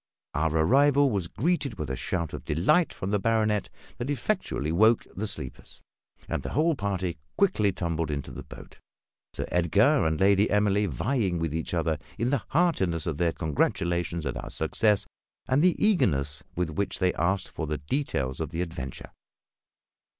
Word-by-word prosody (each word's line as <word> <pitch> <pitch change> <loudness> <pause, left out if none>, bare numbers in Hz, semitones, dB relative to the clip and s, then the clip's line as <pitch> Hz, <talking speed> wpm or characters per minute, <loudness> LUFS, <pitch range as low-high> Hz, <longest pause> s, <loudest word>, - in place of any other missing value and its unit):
Our 80 +2 +1 0.2
arrival 140 - +4
was 95 -5 -1
greeted 145 - -1
with 75 -6 -4
a - - -1
shout 85 +3 -3
of - - -6
delight 90 - +2
from 95 - -4
the 105 - +2
baronet 110 -1 +1 0.3
that 125 +3 -3
effectually 80 - -1
awoke 110 +7 +4
the 110 +3 -2
sleepers; 65 -10 -7 0.5
and - - -2
the - - -5
whole 160 +5 +3
party 95 - -2 0.2
quickly 105 - +3
tumbled 85 -3 -2
into 70 -2 -4
the - - -7
boat, - - -13 0.6
Sir - - -2
Edgar 100 - +3
and 80 -1 -1
Lady 100 +2 +4
Emily 105 0 +2
vying 95 - 0
with 80 -2 -2
each 80 +2 -2
other 80 -2 0 0.2
in 120 +2 0
the 140 -5 +1
heartiness 95 - +1
of 80 -4 -2
their 85 -1 +2
congratulations 85 +2 -1
at 65 - -2
our - - -6
success 105 +6 +1 0.4
and 130 +3 +3
the 180 +1 +4
eagerness 75 - +1
with 90 -2 -1
which 95 +4 -1
they 90 -2 +2
asked 95 +4 0
for 80 - -5
details 75 - -2
of 80 -3 -2
the 85 +1 -3
adventure. 70 -7 -7
95 Hz, 165 wpm, -27 LUFS, 80-115 Hz, 0.6 s, arrival